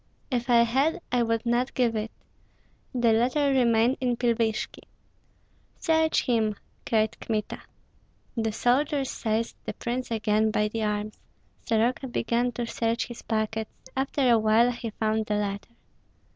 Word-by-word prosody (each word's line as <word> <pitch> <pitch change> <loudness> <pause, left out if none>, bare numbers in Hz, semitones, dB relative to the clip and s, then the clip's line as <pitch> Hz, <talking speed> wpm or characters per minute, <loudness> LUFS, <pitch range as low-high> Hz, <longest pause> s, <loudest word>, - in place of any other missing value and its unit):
"If 245 0 -1
I 235 -1 +6
had, 270 +9 +1
I 245 0 +2
would 230 0 0
not 240 +2 0
give 240 -3 +2
it. 215 +1 -2 0.8
The 240 -3 +3
letter 260 +5 +2
remained 240 0 +3
in 245 -2 0
Pilvishki." 230 -2 0 1.0
"Search 320 -2 +2
him!" 220 -4 +1 0.3
cried 220 0 +1
Kmita. 215 -2 -3 0.7
The 225 -2 0
soldiers 270 +5 +1
seized 225 +1 -2
the - - -3
prince 245 +2 -3
again 220 -1 +1
by 210 0 +1
the 225 +1 -3
arms. 210 0 -2 0.5
Soroka 235 +4 +1
began 240 0 0
to 240 +1 -3
search 230 0 -1
his 240 - -8
pockets. 220 0 -2 0.2
After 270 0 0
a 235 -2 +5
while 220 +3 +4
he 235 -1 -5
found 220 0 -1
the 210 - 0
letter. 205 +2 -3
230 Hz, 145 wpm, -27 LUFS, 220-245 Hz, 1.0 s, I